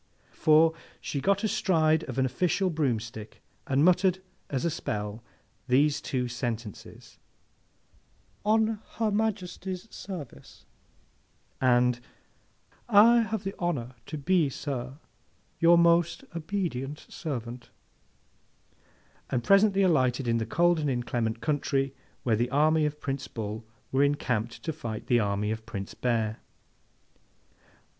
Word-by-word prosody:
For, 160 +1 +5 0.3
she 140 - -4
got 200 +6 +2
astride 160 -7 +2
of 130 -1 -6
an 130 - +3
official 180 +8 0
broomstick, 115 -8 -3 0.3
and 140 +3 +3
muttered 185 +1 +4 0.3
as 135 +2 -2
a 170 - +1
spell 105 -3 -4 0.4
these 140 +3 +3
two 125 -4 -2
sentences, 115 -3 -6 1.2
'On 220 0 +2 0.2
Her 220 -2 +1
Majesty's 195 -2 -2
service,' 150 - -9 1.0
and 125 -1 +3 0.9
'I 230 +2 +7
have 220 -2 -2
the 195 0 -3
honour 140 -9 -2
to 155 - -5
be, 160 +1 +2
sir, 130 -1 -5 0.6
your 170 +1 +6
most 170 0 +3
obedient 155 -5 -3
servant,' 120 -5 -6 1.6
and 120 -2 -1
presently 195 0 +5
alighted 130 -7 +2
in 115 0 +2
the 115 - -3
cold 175 +5 +3
and 150 -2 0
inclement 120 -2 -2
country 135 -2 0 0.3
where 115 -3 +2
the 120 +3 0
army 155 +3 +3
of 150 0 -6
Prince 135 -2 -4
Bull 110 0 -5 0.3
were 135 - +2
encamped 125 -5 -1
to 160 - -2
fight 115 -7 -6
the 120 - +3
army 105 0 0
of 110 0 -5
Prince 100 -4 -6
Bear. 115 -3 -1
140 Hz, 120 wpm, -28 LUFS, 120-175 Hz, 1.6 s, I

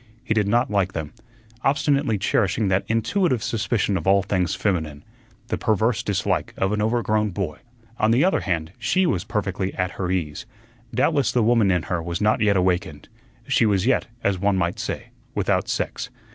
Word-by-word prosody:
He - - 0
did 105 -2 +1
not 120 +2 +2
like 100 -2 +1
them, 80 -3 -5 0.5
obstinately 140 -4 +2
cherishing 100 +1 +1
that 95 +1 +1
intuitive 125 - +1
suspicion 110 -3 0
of 85 - -5
all 100 0 +4
things 90 -3 0
feminine 80 -7 -2 0.5
the - - -1
perverse 110 0 +1
dislike 100 -3 -1
of 95 +1 0
an 105 0 0
overgrown 110 -1 +1
boy. 90 -5 -4 0.4
On 110 - +3
the 120 +6 +4
other 190 - +2
hand, 85 -4 -2
she 130 +12 +2
was 95 - 0
perfectly 95 -2 -2
at 90 0 -1
her 90 - -1
ease; 85 -4 -2 0.4
doubtless 145 -6 +2
the 120 - +2
woman 115 -3 +4
in 90 -3 +2
her 90 +2 -2
was 85 +1 -3
not 105 +1 +2
yet 105 -2 +3
awakened; 90 -5 -1 0.4
she 120 -4 +3
was 100 -2 +1
yet, 130 0 +2 0.2
as 100 -2 +1
one 100 0 +2
might 85 -1 -1
say, - - -5 0.2
without - - 0
sex. 120 +1 -2
100 Hz, 180 wpm, -23 LUFS, 90-115 Hz, 0.5 s, all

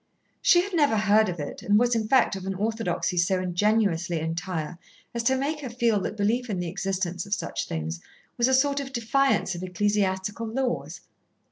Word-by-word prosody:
She 350 -1 +5
had 400 0 -7
never 290 -9 +3
heard 215 0 +4
of 175 -2 -5
it, 145 - -6
and 205 +1 +3
was 245 +2 +3
in 220 -2 0
fact 260 -4 +3
of 190 0 -6
an 195 - -2
orthodoxy 210 -3 -1
so 180 +2 +2
ingenuously 185 -2 +1
entire 165 +1 -4 0.3
as 235 - -1
to 260 +3 +2
make 295 +3 -2
her 275 -4 -6
feel 235 -3 +1
that 215 - -4
belief 230 +4 0
in 195 -4 -2
the 180 - -2
existence 185 0 -3
of 200 - +1
such - - -4
things 80 +1 -4 0.3
was 240 0 +2
a 260 - +4
sort 280 +1 +2
of 275 -1 -6
defiance 245 -2 +1
of 175 - -6
ecclesiastical 200 +3 -1
laws. 250 +2 -3
205 Hz, 195 wpm, -26 LUFS, 180-240 Hz, 0.3 s, She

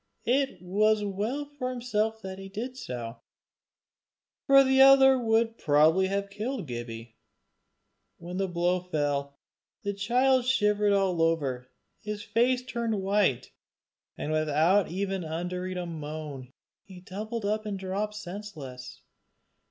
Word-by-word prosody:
It 260 -7 0
was 210 +3 +2
well 210 +9 -2
for 285 -3 -5
himself 220 -3 -2
that 190 0 -6
he 195 0 -9
did 235 +6 -5
so, 120 - -6 1.3
for 275 -1 +8
the 265 0 +4
other 270 -1 +7
would 225 0 +1
probably 155 +5 +4
have 200 +1 -2
killed 220 +1 -4
Gibbie. 120 -2 -7 1.0
When 175 +2 -7
the 195 0 0
blow 175 +1 +1
fell 145 -5 -2 0.5
the 200 -1 -2
child 250 +5 +2
shivered 210 -5 +2
all 190 -4 +2
over, 140 -7 0 0.3
his 210 -1 -5
face 250 +3 +1
turned 235 -4 -2
white, 190 - +1 0.7
and 150 - -3
without 155 +5 +3
uttering 180 -1 -3
even 185 - -5
a 180 - -3
moan, 150 -5 -7 0.3
he 185 -2 -13
doubled 215 +4 -5
up 215 +1 -1
and 200 -2 -3
dropped 195 +3 -3
senseless. 175 -11 -8
195 Hz, 130 wpm, -28 LUFS, 165-225 Hz, 1.3 s, for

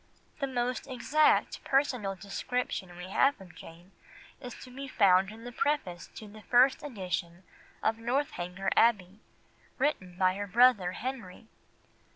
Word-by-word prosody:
'" - - -33
The 275 - 0
most 250 0 -2
exact 285 +4 +2
personal 250 -8 0
description 195 -2 -4
we 180 +1 -8
have 275 +7 +2
of 185 -2 -13
Jane 170 +3 -14 0.5
is 250 -3 -8
to 255 -1 -13
be 275 +1 -6
found 195 -6 +4
in 220 +2 -11
the 245 - -7
preface 230 - -2
to 215 - -9
the 215 +1 -13
first 250 +4 +4
edition 185 -8 -5 0.4
of 225 +1 +1
Northanger 210 -7 -2
Abbey, 205 -4 +2 0.6
written 195 -11 -1
by 185 -1 +3
her 205 +1 -5
brother 215 -4 +4
Henry. 230 -4 -7
220 Hz, 145 wpm, -30 LUFS, 185-255 Hz, 0.6 s, found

